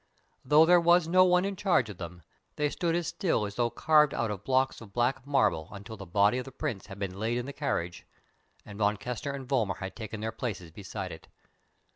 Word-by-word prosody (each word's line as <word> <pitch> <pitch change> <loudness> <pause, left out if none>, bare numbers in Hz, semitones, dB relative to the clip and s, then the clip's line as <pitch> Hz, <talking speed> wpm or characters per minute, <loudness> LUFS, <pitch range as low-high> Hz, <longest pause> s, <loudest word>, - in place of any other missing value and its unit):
Though 150 +4 +6
there 175 +1 +6
was 170 0 +4
no 185 +2 +6
one 180 +1 +3
in 200 0 -2
charge 180 - +2
of 100 -4 -9
them, 85 -1 -8 0.3
they 150 -1 0
stood 170 -2 0
as 175 -1 -1
still 160 - 0
as 100 - -6
though 120 +2 +1
carved 150 +2 +3
out 115 -2 -1
of 100 -1 -6
blocks 130 +1 +1
of 105 -4 -12
black 130 +3 0
marble 85 - +1
until 100 +2 -9
the 100 -3 -10
body 100 +7 +3
of 125 - -5
the 135 - -9
Prince 130 -6 -4
had 100 -2 -9
been 100 -1 -5
laid 115 +3 0
in 125 - -3
the 140 - -6
carriage 85 -8 -3 0.6
and 100 0 -10
Von 105 0 +2
Kessner 125 +1 -4
and 135 -2 -8
Vollmar 115 -9 0
had 95 0 -6
taken 110 -2 -6
their 110 +1 -3
places 100 -7 -5
beside 95 +3 -6
it. - - -11
120 Hz, 225 wpm, -29 LUFS, 100-150 Hz, 0.6 s, Though